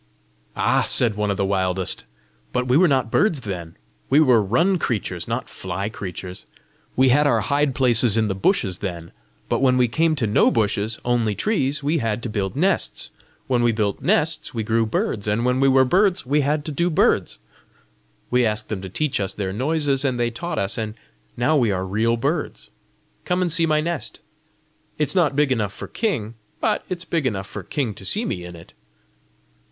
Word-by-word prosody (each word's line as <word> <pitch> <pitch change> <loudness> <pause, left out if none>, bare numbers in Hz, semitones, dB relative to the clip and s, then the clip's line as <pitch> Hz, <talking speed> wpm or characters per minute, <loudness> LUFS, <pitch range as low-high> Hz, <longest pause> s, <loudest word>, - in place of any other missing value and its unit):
"Ah," - - +2
said 120 -3 +4
one 105 0 -1
of 100 - -1
the 100 - +1
wildest, 95 -1 0 0.5
"but 125 0 -1
we 125 - +3
were 180 +4 +6
not 130 -6 +1
birds 170 -10 +2
then! 85 -6 -6 0.3
We 140 - +5
were 125 -7 +5
run 165 - +2
creatures, 95 - -3
not - - -3
fly 100 +4 -4
creatures! 90 -3 -7 0.5
We 130 0 +4
had 145 +4 +4
our - - +2
hide 140 -2 0
places 120 -4 +3
in 110 -1 +2
the 100 - -1
bushes 95 - 0
then; 85 -4 -5 0.4
but - - 0
when 130 -1 +4
we 125 -1 +4
came 160 +6 +1
to 135 -6 -1
no 105 - +4
bushes, 110 0 0
only 120 -4 +1
trees, 145 - -1
we 155 +3 +1
had 115 -1 -2
to 120 - -4
build 100 +1 -2
nests! 185 +6 0 0.3
When 125 -2 +1
we 120 0 +3
built 105 -3 -1
nests, 155 -3 0
we 110 - -1
grew 115 +1 +1
birds, 105 -1 -2
and 105 +3 0
when 125 +1 +1
we 135 - +4
were 130 0 +5
birds, 185 +3 +2
we 145 +3 +2
had 145 +1 0
to 155 - -4
do 170 +5 0
birds! 155 - +2 0.9
We 125 0 +3
asked 110 -1 -1
them 105 -4 -3
to 95 - -7
teach 150 +8 -1
us 95 -1 -2
their 95 -2 -3
noises, 140 +3 0
and 130 -3 0
they 120 0 +1
taught 170 +7 -5
us, 100 +4 -1
and 110 -1 -4 0.4
now 120 +6 +2
we 120 -6 +3
are 95 -1 -2
real 110 +5 +1
birds! 145 +6 -3 0.5
Come 180 0 0
and 175 -3 0
see 165 -1 +2
my 155 -1 +2
nest. 155 -8 -4 0.8
It's 150 -1 +1
not 160 -7 +2
big 145 -1 +2
enough 105 -6 0
for - - -8
king, 135 - -2 0.3
but - - 0
it's 180 -1 -4
big 160 -6 0
enough 95 -5 -3
for - - -7
king 130 -8 -3
to 95 - -12
see 210 - -1
me 90 - -3
in 90 0 -9
it!" 85 0 -14
120 Hz, 200 wpm, -22 LUFS, 105-150 Hz, 0.9 s, were